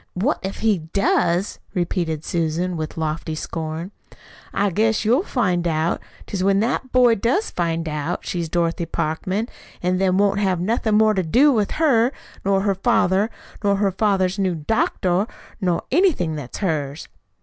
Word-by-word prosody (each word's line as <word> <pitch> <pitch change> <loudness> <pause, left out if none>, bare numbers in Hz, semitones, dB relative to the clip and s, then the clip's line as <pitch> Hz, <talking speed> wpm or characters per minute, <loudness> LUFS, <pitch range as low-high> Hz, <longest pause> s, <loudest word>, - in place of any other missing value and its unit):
"'What 220 +12 0
if 190 0 -5
he 215 -4 +2
does?'" 175 +2 0 0.2
repeated 170 -3 -1
Susan, 170 +2 -1
with 155 0 -5
lofty 160 0 -2
scorn. 160 +3 -5 0.6
"I 200 -1 +1
guess 220 +4 +1
you'll 245 +8 +4
find 185 - 0
what 160 -1 0 0.2
'tis 190 -2 -3
when 195 0 +3
that 250 +3 -1
boy 250 -2 +5
does 240 - 0
find 165 -1 -1
out 150 +3 -3
she's 170 -2 -3
Dorothy 170 0 0
Parkman, 185 +8 -2 0.4
an' 180 +1 +1
then 190 -1 +2
won't 200 0 +2
have 190 -3 +1
nothin' 220 +3 +1
more 215 0 +5
to 190 - +1
do 250 - +4
with 215 -6 +1
her, 260 -6 +3 0.3
nor 195 0 +2
her 200 0 +2
father, 190 +2 +2 0.3
nor 200 -1 +3
her 200 0 +1
father's 190 -1 +1
new 185 -3 +1
doctor, 180 +2 0 0.3
nor 180 -3 0
anything 285 - +2
that 145 -5 -6
is - - -7
hers." 155 -5 -2
185 Hz, 160 wpm, -22 LUFS, 165-210 Hz, 0.6 s, boy